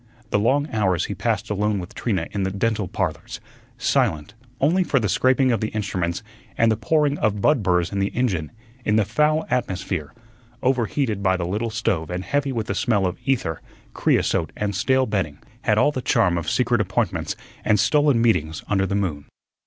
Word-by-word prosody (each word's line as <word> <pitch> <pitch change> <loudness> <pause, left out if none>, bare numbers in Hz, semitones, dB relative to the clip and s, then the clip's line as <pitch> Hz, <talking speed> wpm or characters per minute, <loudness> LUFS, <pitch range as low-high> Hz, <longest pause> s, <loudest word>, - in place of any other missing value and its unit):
The 105 - +3
long 140 +7 +2
hours 95 -5 +1
he - - -4
passed 110 +2 -2
alone 105 +1 0
with 90 -1 -6
Trina 95 -8 -1
in 100 - -2
the 95 - 0
"Dental 105 +1 -1
Parlors," - - -3 0.4
silent, 80 +4 0 0.3
only 170 +7 +3
for 140 -6 +1
the 110 - 0
scraping 130 +6 +3
of 115 - 0
the 110 - 0
instruments 95 -4 -2 0.3
and 115 0 +4
the - - +2
pouring 145 +6 +1
of 105 -1 +1
bud 150 +4 +3
burrs 90 -3 +1
in 100 - -2
the 100 - +2
engine, 95 -12 0 0.3
in 105 - +1
the 110 -2 +3
foul 150 +8 +1
atmosphere, 95 - -2 0.5
overheated 125 -3 0
by 95 -1 +2
the 90 - -2
little 105 +6 -2
stove 100 -7 -1
and 90 +1 -3
heavy 140 +4 0
with 115 -4 -2
the 100 - -2
smell 100 -1 +1
of 90 - -2
ether, 115 - 0 0.3
creosote, - - +1
and 100 -2 -2
stale 130 +6 +2
bedding, 95 - -2 0.3
had - - +3
all 150 - +4
the 130 - -4
charm 90 -7 +2
of 85 -2 -2
secret - - +2
appointments - - -1 0.3
and 105 -1 +3
stolen 145 -2 +3
meetings 80 -10 +1
under 95 -2 +1
the 100 - -1
moon. 85 -8 -2
105 Hz, 190 wpm, -23 LUFS, 95-125 Hz, 0.5 s, and